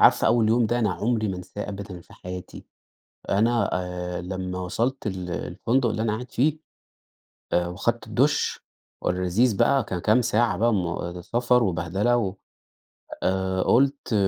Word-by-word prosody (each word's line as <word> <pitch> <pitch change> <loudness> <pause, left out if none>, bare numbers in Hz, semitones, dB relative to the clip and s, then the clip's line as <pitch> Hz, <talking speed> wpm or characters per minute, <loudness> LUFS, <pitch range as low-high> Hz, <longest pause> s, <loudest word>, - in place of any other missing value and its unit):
عارفة - - +6
أول 115 -2 +4
يوم 115 0 +3
ده 120 +2 0
أنا 110 -4 +2
عمري 110 -1 0
ما 95 - -2
أنساه 90 +3 -7
أبدًا 100 -3 -7
في - - -18
حياتي. 90 0 -8 0.6
أنا 110 +1 +2
آآ، 90 -1 -3
لمّا 90 0 -4
وصلت 115 +8 -2
ال 90 -3 -3
الفندق 120 +7 0
اللي 110 +1 -1
أنا 110 -2 +1
قاعد 125 +3 -6
فيه 150 +5 +2 0.9
آآ، 85 0 +2
وأخدت 110 +6 -2
الدش 130 +7 +1 0.4
اللذيذ 90 +5 +2
بقى 135 +5 +3
ك - - -5
كام 110 +4 +4
ساعة 120 -2 +2
بقى 115 +3 +3
مو 85 -1 -2
سفر 120 +4 +2
وبهدلة 95 +5 +1
و 100 -5 -1 0.9
آآ، 95 0 0
قلت، 135 -1 +2
105 Hz, 150 wpm, -25 LUFS, 90-120 Hz, 0.9 s, عارفة